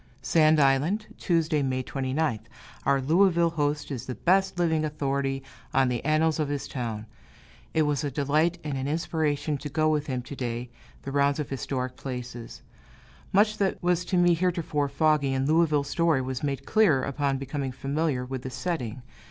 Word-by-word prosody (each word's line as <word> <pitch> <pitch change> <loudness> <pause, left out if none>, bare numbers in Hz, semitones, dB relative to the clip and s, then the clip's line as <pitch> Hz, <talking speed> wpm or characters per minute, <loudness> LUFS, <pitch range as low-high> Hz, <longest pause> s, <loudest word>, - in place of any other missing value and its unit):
Sand 155 -1 +4
Island, 150 +10 +2
Tuesday, 165 -4 +1
May 130 -1 -1
29th. 130 -3 -2 0.4
Our 140 0 +4
Louisville 170 +4 +3
host 145 -2 -1
is 125 -5 -5
the 125 - -4
best 190 +1 +2
living 160 -3 +1
authority 140 -2 -1 0.3
on 135 -1 +4
the 120 -2 -2
annals 155 +1 +2
of 150 -2 0
his 145 -1 -3
town. 115 -4 -4 0.7
It 160 - +4
was 150 -1 0
a 145 - -1
delight 150 +5 +1
and 145 -3 -3
an 130 - -2
inspiration 155 -2 -1
to 145 - -6
go 155 +2 +1
with 150 -1 0
him, 130 -3 -2
to 140 - -8
day, 120 -1 -4 0.3
the 135 - -5
rounds 140 +1 +2
of 150 - -3
the - - -4
historic 130 -1 -3
places. 125 -3 -7 0.7
Much 210 +2 +3
that 195 -2 +1
was 180 0 +2
to 185 - 0
me 175 0 +5
heretofore 165 -4 0
foggy 140 -1 +2
in 135 0 0
Louisville 155 -1 +3
story 155 -1 +1
was 130 -1 -4
made 140 -2 -2
clear, 185 -12 +3
upon 140 0 -1
becoming 135 0 -3
familiar 135 +1 -1
with 130 0 -5
the 130 - -5
setting. 125 -5 -4
145 Hz, 175 wpm, -27 LUFS, 135-160 Hz, 0.7 s, me